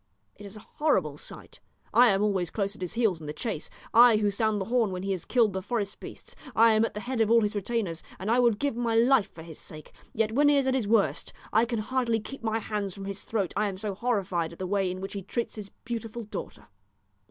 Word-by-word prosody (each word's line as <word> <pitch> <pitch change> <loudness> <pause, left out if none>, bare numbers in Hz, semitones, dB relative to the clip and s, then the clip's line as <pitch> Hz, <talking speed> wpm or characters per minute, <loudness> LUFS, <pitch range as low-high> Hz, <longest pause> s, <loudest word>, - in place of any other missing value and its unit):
It 205 - -10
is 200 +2 -10
a - - -11 0.2
horrible 180 - +1
sight. - - -10 0.3
I 245 +1 +7
am 195 -2 +3
always 190 -5 0
close 200 0 -2
at - - -15
his 180 - -4
heels 220 -8 +1
in 150 - -8
the 150 - -4
chase, 170 -1 -4 0.2
I 235 -1 +8
who 210 -1 +1
sound 215 +1 0
the 190 - -2
horn 230 -1 +2
when 185 0 -4
he 195 - -2
has 185 -3 -3
killed 230 -5 +3
the 190 - -2
forest 205 -1 -3
beasts; - - -11 0.2
I 230 +1 +6
am 220 0 +3
at 225 - -2
the 210 - -4
head 250 -1 -2
of 220 - +3
all 230 0 +6
his 210 0 0
retainers, 205 -5 -2 0.2
and 195 +4 -2
I 245 - +4
would 235 -4 +4
give 280 0 -1
my 235 -1 0
life 235 -2 +4
for 160 - -9
his 160 -2 -9
sake; 155 -1 -9 0.2
yet 220 0 0
when 290 +5 +4
he 290 - +4
is 275 - +2
at 265 - +2
his 250 -6 0
worst 215 -2 +1 0.2
I 220 +2 +5
can 235 0 -2
hardly 235 +1 0
keep 270 +6 -8
off - - -8
my 220 - +1
hands 210 -3 -3
from 195 -1 -7
his 200 0 -5
throat, 200 -6 -2
I 210 +1 +1
am 195 -2 -4
so 205 0 -3
horrified 190 -7 -1
at - - -13
the 185 - -4
way 195 0 0
in 185 +1 -5
which 195 - -5
he 200 - -4
treats 230 +5 -3
his 210 -2 -8 0.2
beautiful 230 0 -5
daughter." 210 - -7
210 Hz, 265 wpm, -28 LUFS, 195-235 Hz, 0.3 s, I